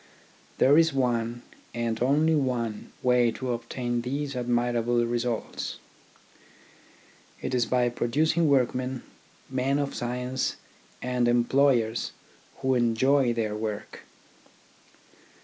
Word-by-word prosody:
There 145 +4 +6
is 165 -2 +3
one 120 -2 0
— - - -28
and 115 -1 -2
only 150 +5 +3
one 125 -7 -1
— - - -29
way 125 -1 +4
to 130 -2 -3
obtain 120 0 -3
these 140 +3 -3
admirable 120 -1 +1
results. 120 -1 -3 1.6
It 130 - -4
is 120 -2 +2
by 125 -1 +2
producing 155 +7 +1
workmen, 130 -1 +1 0.4
men 130 +1 0
of 140 -1 -2
science, 125 +1 -2 0.5
and 125 -1 +1
employers 120 -1 +2 0.5
who 130 0 +3
enjoy 125 +2 +3
their 110 -2 -2
work. 105 -1 -5
125 Hz, 110 wpm, -27 LUFS, 120-130 Hz, 1.6 s, There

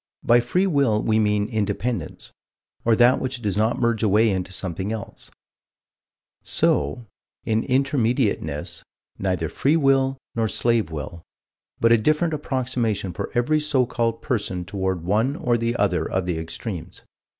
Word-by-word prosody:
By 120 +1 +5
free 180 +11 +1
will 140 - +2
we 110 0 +2
mean 105 -1 +2
Independence 110 +2 -3 0.5
or 115 -1 +4
that 120 +2 +5
which 130 -1 -3
does 100 -3 -1
not 110 +3 +1
merge 120 -2 +1
away 110 +1 +3
into 95 -1 -3
something 95 +2 -4
else 110 -3 -7 1.1
so, 75 +12 0 0.4
in 110 0 +1
Intermediateness, 125 - 0 0.4
neither 90 -4 -1
free 145 - +1
will 135 -2 +2 0.2
nor 115 -1 0
slave 115 -2 +1
will 80 +1 -6 0.6
but 115 - +4
a 115 - +6
different 155 +7 +1
approximation 125 - -2
for - - -4
every 150 +6 +2
so 150 -4 +2
called 115 -1 -2
person 100 -7 -2
toward 95 -3 -2
one 110 +10 +1
or 120 -5 0
the 115 0 -1
other - - 0
of 95 -1 -1
the 90 -3 -2
extremes. 85 +1 -6
115 Hz, 145 wpm, -23 LUFS, 95-125 Hz, 1.1 s, a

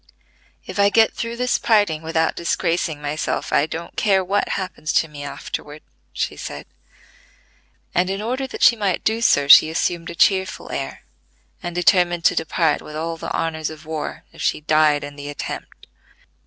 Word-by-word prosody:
"If - - -6
I 200 0 +5
get 220 +2 +4
through 230 0 -4
this 250 0 +1
parting 205 -9 +2
without 160 0 0
disgracing 165 -2 -1
myself, 145 +2 -2
I 150 - +3
don't 165 +1 -7
care 195 -3 +2
what 200 +3 0
happens 185 -5 -4
to 160 - +3
me 145 -2 -9
afterward," 145 +1 -7 0.3
she - - -3
said; - - -7 1.3
and, 180 +1 +2
in 195 +1 -2
order 255 +5 -2
that - - -5
she 235 - +7
might 200 -5 -1
do 220 +1 0
so, 145 -11 +3
she 155 - +9
assumed 165 +1 -1
a 170 - -7
cheerful 190 +1 +1
air, - - -5 0.6
and 175 -2 -5
determined 175 -2 +3
to - - +5
depart 160 -1 +1
with 150 - -10
all 165 +2 -3
the 165 - -6
honors 160 -1 -2
of 155 0 -11
war, 155 -1 -5
if - - -11
she - - 0
died 155 -1 +3
in 145 0 -8
the 145 0 -7
attempt. 145 - -7
165 Hz, 175 wpm, -21 LUFS, 155-195 Hz, 1.3 s, she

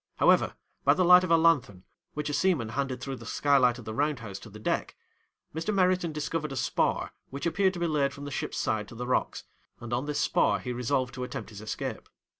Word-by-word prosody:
However, - - +3 0.3
by - - +5
the 185 - +2
light 180 +1 +8
of 185 - -2
a 165 - +6
lanthorn, 145 - +2 0.3
which 150 0 -3
a 145 - -2
seaman 145 -8 +1
handed 130 +2 -3
through 135 -1 -4
the 115 - -11
skylight 130 -4 +3
of 120 - -11
the 110 - -5
round 145 +4 0
house 100 -4 -7
to 110 - -12
the 105 - -11
deck, 110 - -2 0.6
Mr. 165 +7 -2
Meriton 185 -3 +2
discovered 155 0 -3
a - - -4
spar 130 - 0 0.2
which 140 +1 -6
appeared 190 +3 +2
to - - -5
be 170 - 0
laid 145 -4 +1
from 140 0 -9
the 145 - -6
ship's 120 - -3
side 110 -1 -1
to - - -12
the 125 +2 -5
rocks, 125 - -1 0.4
and 120 0 -6
on 125 +4 -1
this 150 - -1
spar - - +2
he 125 - -5
resolved 125 +1 -1
to 130 - -5
attempt 115 -3 -6
his 105 -1 -9
escape. 110 - -5
140 Hz, 230 wpm, -28 LUFS, 120-160 Hz, 0.6 s, light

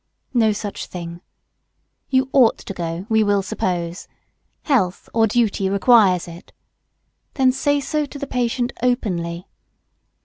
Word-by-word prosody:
No 225 -3 +3
such 205 -1 -5
thing. 170 -1 -8 0.9
You 260 0 +2
ought 255 -5 +5
to 195 - -8
go, 170 0 -4
we 220 -2 +3
will 205 -1 +2
suppose. 175 -2 -3 0.6
Health 195 - 0
or 225 -1 +3
duty 205 -3 +1
requires 200 -3 +4
it. 170 0 -12 0.8
Then 260 -2 +4
say 285 +2 +1
so 300 +1 -2
to 285 - -9
the 280 - -4
patient 245 -1 -1
openly. 180 -8 -1
215 Hz, 130 wpm, -21 LUFS, 180-250 Hz, 0.9 s, ought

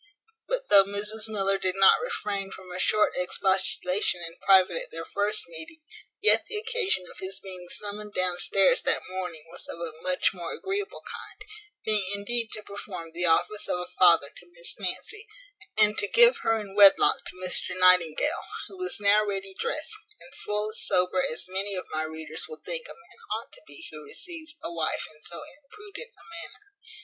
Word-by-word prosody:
But - - -2
though 195 - +8
Mrs 210 +2 -1
Miller 195 -2 0
did 185 -1 -1
not 195 0 +6
refrain 205 - -3
from 185 -1 -11
a 180 - -6
short 215 +3 +2
expostulation 185 0 0
in 165 0 -6
private 185 -3 +5
at - - -5
their 165 0 -6
first 205 +1 -1
meeting, 165 - -4 0.4
yet 430 - +6
the 430 - -3
occasion 445 - -1
of - - -13
his 190 0 -4
being 185 -2 -9
summoned 210 +1 -5
downstairs 185 +1 +3
that - - +2
morning 180 -4 -6
was - - -2
of 165 - -7
a 170 -2 -4
much 185 +1 +1
more 175 -3 -5
agreeable 395 +2 -4
kind, 425 - -9 0.4
being 215 -2 +2
indeed 230 +3 -1
to 215 - -2
perform 195 -5 -8
the 175 +1 0
office 205 +6 +2
of - - 0
a 180 - -6
father 170 - +6
to 175 0 -12
Miss 170 - -4
Nancy, 410 - -4 0.5
and 215 0 +4
to 205 - +2
give 480 - +6
her 225 0 0
in 200 -2 -8
wedlock 200 -1 +7
to - - -5
Mr 185 0 0
Nightingale, 185 - +4 0.2
who 385 - -12
was 370 -10 0
now 205 +1 +4
ready 195 -2 -4
drest, 305 - -1 0.3
and 265 - -12
full 210 +1 -1
as 215 - -8
sober 180 0 +2
as 160 - -2
many 195 +2 -2
of 185 - -4
my 155 - -1
readers 160 0 -6
will 465 - -9
think - - -3
a - - -9
man 455 - -19 0.2
ought - - -15
to - - -11
be 325 - -9
who 155 -1 -9
receives 330 - -7
a 170 - -3
wife 160 -2 +1
in 150 - -18
so 170 0 -4 0.2
imprudent 420 +9 -10
a - - -16 0.2
manner. 415 +4 -11
195 Hz, 190 wpm, -27 LUFS, 180-225 Hz, 0.5 s, though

